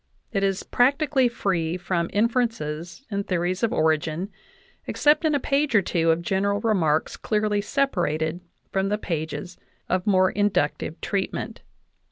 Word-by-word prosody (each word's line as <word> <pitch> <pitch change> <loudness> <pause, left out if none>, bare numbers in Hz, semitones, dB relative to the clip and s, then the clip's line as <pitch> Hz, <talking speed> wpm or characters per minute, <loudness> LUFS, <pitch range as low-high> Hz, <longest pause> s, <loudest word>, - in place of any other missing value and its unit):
It 200 -4 0
is 195 -1 0
practically 275 +1 +2
free 180 -7 -1
from 175 -2 -1
in 210 +3 +3
ferences 225 - -3
and 200 0 -2
theories 180 0 -1
of 230 - +1
origin, 160 +4 0 0.6
except 300 +3 +3
in 305 -2 +3
a - - +2
page 280 -1 +1
or 200 - +5
two 165 -2 +1
of 165 +1 +2
general 200 +3 0
remarks 175 -9 +1
clearly 210 -1 0
separated 175 - 0 0.3
from 195 0 0
the 210 - +1
pages 170 -1 -4 0.3
of 185 +1 -1
more 185 -2 +4
in 205 0 +2
ductive 150 -3 -1
treatment. 195 -2 -3
195 Hz, 150 wpm, -24 LUFS, 170-225 Hz, 0.6 s, or